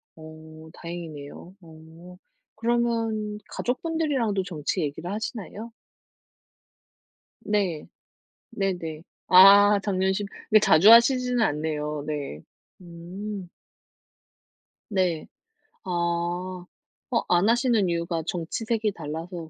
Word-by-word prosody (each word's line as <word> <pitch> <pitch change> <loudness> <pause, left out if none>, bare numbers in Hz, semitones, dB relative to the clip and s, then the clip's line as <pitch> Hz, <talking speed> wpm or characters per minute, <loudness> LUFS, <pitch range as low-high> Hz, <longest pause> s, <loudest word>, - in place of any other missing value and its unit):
어 155 0 -13
다행이네요. 170 0 -9
어 165 +2 -15 0.4
그러면 225 -2 -1
가족분들이랑도 260 - -1
정치 175 0 -3
얘기를 160 +5 -4
하시나요? 220 +1 -6 1.7
네. 190 -7 -1 0.6
네네. 175 -7 -3 0.2
아 200 +2 +8
작년 190 -1 0
10 205 +1 -3 0.2
그렇게 215 - +6
자주 195 +2 +6
하시지는 250 +1 +5
않네요. 150 -2 -2
네. 145 - -5 0.4
음. 180 +3 -8 1.4
네. 180 -5 -1 0.6
아. 175 +1 -2 0.5
어 - - +2
안 175 +3 +3
하시는 235 -4 +2
이유가 170 -1 -2
정치색이 210 +6 -2
달라서 165 +2 -7
180 Hz, 195 characters per minute, -25 LUFS, 165-215 Hz, 1.7 s, 아